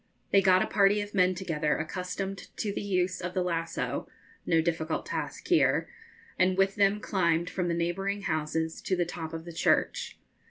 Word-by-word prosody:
They 195 - +6
got 185 -1 +5
a - - -1
party 200 0 +3
of 205 0 -7
men 185 -2 +3
together 155 -5 -1
accustomed 180 +4 -4
to 205 -2 -2
the - - -3
use 185 -3 0
of 180 +1 -4
the 185 - +1
lasso 165 -2 -2 0.4
no 165 - +4
difficult 160 -1 -1
task - - -4
here - - +3 0.5
and 185 0 +3
with 195 0 +3
them 200 0 +3
climbed 170 -4 +1
from 180 -1 -1
the 170 - 0
neighbouring 195 +4 -1
houses 160 0 -1
to 185 - 0
the 175 -1 +1
top 165 -2 -6
of 165 0 -6
the 170 - -8
church. - - +1
180 Hz, 185 wpm, -29 LUFS, 165-195 Hz, 0.5 s, They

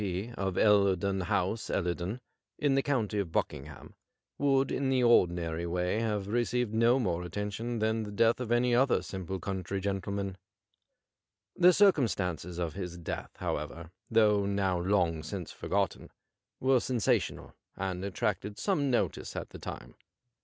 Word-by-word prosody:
P., 100 +3 -3
of 95 -2 -2
EUerdon 100 -2 +3
House, 100 +1 0
Ellei 85 -2 0
don, 95 +8 -5 0.4
in 145 -2 +2
the 135 - +3
county 115 -7 0
of 95 -5 -2
Buckingham, 70 -1 -4 0.5
would 135 -1 +2
in 135 0 0
the 130 -1 +2
ordinary 85 -7 +3
way 90 +4 0
have 105 -3 -1
received 120 0 0
no 115 +3 +4
more 90 -9 0
attention 105 +6 -4
than 110 +1 +1
the 105 -1 -5
death 115 +3 +3
of 120 -2 -4
any 120 +1 +3
other 130 +2 +3
simple 95 0 -5
country 95 0 -3
gentle 100 0 -2
man. 100 -1 -3 1.2
The 180 0 +7
circumstances 100 - +2
of 85 -3 -2
his 90 -2 -5
death, 85 - -5
however, 80 +3 -4 0.2
though 105 -3 +4
now 95 -3 +1
long 90 -3 +1
since 90 +2 -6
forgotten, - - -2 0.5
were 130 0 +4
sensational, 120 -3 0 0.2
and 95 -1 -3
attracted 100 +1 -2
some 150 -9 0
notice 125 - -1
at - - -5
the - - -9
time. - - -8
100 Hz, 150 wpm, -30 LUFS, 90-120 Hz, 1.2 s, The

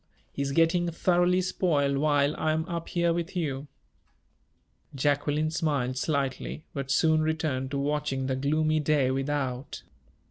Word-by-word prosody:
He - - -4
is 140 0 -1
getting 165 +3 +3
thoroughly 175 +2 +2
spoiled 150 -7 +1
while 145 -1 +2
I 155 0 0
am 160 0 -1
up 170 -2 -4
here 170 -1 +1
with 170 +2 -4
you." 145 -5 -2 1.3
Jacqueline 145 +2 +1
smiled 145 -6 -1
slightly, 140 +2 -2
but 140 -2 -4
soon 155 +2 +3
returned 155 -4 -1
to 140 - -3
watching 140 -1 -1
the 130 0 -1
gloomy 155 +3 +1
day 145 -3 +2
without. 135 -1 -3
150 Hz, 140 wpm, -27 LUFS, 140-160 Hz, 1.3 s, getting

